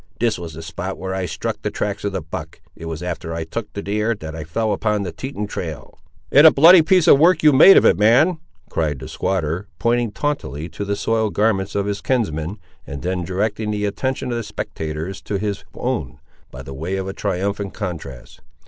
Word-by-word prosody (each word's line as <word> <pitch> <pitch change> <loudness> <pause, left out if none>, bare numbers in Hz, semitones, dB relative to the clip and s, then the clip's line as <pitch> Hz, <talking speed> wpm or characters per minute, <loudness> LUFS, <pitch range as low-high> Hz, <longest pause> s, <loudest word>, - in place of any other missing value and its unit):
"This 115 -5 +1
was 85 -3 -7
the 80 - -8
spot 85 +4 -5
where 95 0 -4
I 95 -1 -2
struck - - -4
the - - -1
tracks 100 -1 -3
of 100 - -1
the 95 -4 -4
buck; 80 - -7 0.2
it 80 - -9
was 80 0 -5
after 85 -1 -4
I 85 - -3
took 105 +7 -6
the 100 - -5
deer, 105 +3 0
that 80 -5 -8
I 80 - -5
fell 105 +8 -1
upon 105 -2 0
the 90 - -4
Teton 130 -3 -5
trail." 80 -8 -7 0.3
"And 145 +3 +8
a - - +9
bloody 165 +5 +8
piece 180 +1 +3
of 140 - +7
work 165 +1 +4
you 150 -1 +7
made 155 +8 +9
of - - +5
it, 85 - +4
man," 135 +11 +4 0.3
cried 75 -3 -1
the - - -8
squatter, 90 +1 -2
pointing 120 +2 +1
tauntily 85 - -3
to 100 - -5
the 100 0 -1
soiled 110 0 0
garments 100 -2 +1
of 100 -1 0
his 100 0 -3
kinsman, 95 -7 -1 0.3
and 70 +2 -7
then 90 0 -1
directing 105 +4 -2
the 105 -1 -1
attention 130 +5 -2
of 120 - -1
the - - -2
spectators 80 -2 -5
to 100 - -3
his 100 0 -3
own, 120 - -3 0.3
by - - -9
the 70 - -8
way 80 +8 -3
of 95 0 -3
a 95 - -4
triumphant 100 +1 -2
contrast. 80 - -7
100 Hz, 215 wpm, -21 LUFS, 85-115 Hz, 0.3 s, a